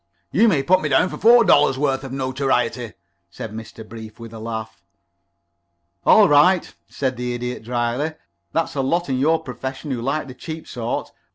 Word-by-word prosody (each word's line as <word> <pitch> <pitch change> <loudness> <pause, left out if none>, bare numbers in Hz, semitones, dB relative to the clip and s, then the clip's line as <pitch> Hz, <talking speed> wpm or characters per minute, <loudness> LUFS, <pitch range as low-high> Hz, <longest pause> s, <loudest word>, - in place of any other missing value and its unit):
"You 230 - +4
may 150 -10 +2
put 185 +4 +3
me 150 - -1
down 145 +7 +3
for - - -7
four 235 +3 +7
dollars' 145 -6 +4
worth 135 -1 0
of 135 - -7
notoriety," 130 -3 -1 0.4
said 105 +5 -8
Mr. 110 0 -9
Brief, 110 -1 -10
with 115 -1 -10
a 110 - -8
laugh. 110 -4 -6 1.3
"All 215 -2 +7
right," 165 +5 +4 0.2
said 130 -3 -2
the 125 0 -3
Idiot, 125 +1 -4
dryly. 120 +6 -1 0.4
"There's 165 -2 -1
a 135 - 0
lot 170 +6 0
in 130 -1 0
your 160 +4 +2
profession 130 +2 -6
who 125 -3 -2
like 140 +4 -2
the 130 - -8
cheap 160 +5 -8
sort. 120 -1 -4
130 Hz, 180 wpm, -21 LUFS, 120-155 Hz, 1.3 s, four